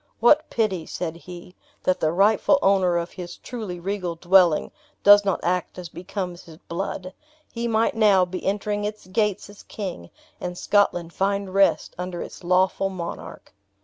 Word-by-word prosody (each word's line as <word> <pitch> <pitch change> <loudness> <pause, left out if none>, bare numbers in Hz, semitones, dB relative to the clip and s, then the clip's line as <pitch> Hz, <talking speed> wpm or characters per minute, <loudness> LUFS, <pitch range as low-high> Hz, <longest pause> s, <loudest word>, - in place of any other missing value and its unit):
"What 295 +7 +4
pity," 190 -8 -1
said 165 -2 -4
he, 175 +1 -11 0.3
"that 185 - +1
the 155 - +1
rightful 205 - +4
owner 190 -3 +3
of 170 +1 -3
his 175 -2 -8
truly 215 -8 -6
regal 180 -1 -3
dwelling 175 -2 +4 0.3
does 205 0 +8
not 195 -1 0
act 180 +1 -1
as 180 -2 -7
becomes 180 0 -6
his 160 -2 -14
blood! 185 +1 -5 0.4
He 235 0 -2
might 225 0 +2
now 205 -5 +4
be 185 +1 -6
entering 205 +1 -1
its 210 -1 -5
gates 205 +1 -1
as 205 0 -14
king, 180 - -7 0.3
and 180 0 -5
Scotland 175 -5 +1
find 200 0 -1
rest 195 0 +2
under 180 -1 -4
its - - -11
lawful 185 +2 +2
monarch." 175 -3 -8
185 Hz, 160 wpm, -24 LUFS, 175-205 Hz, 0.4 s, does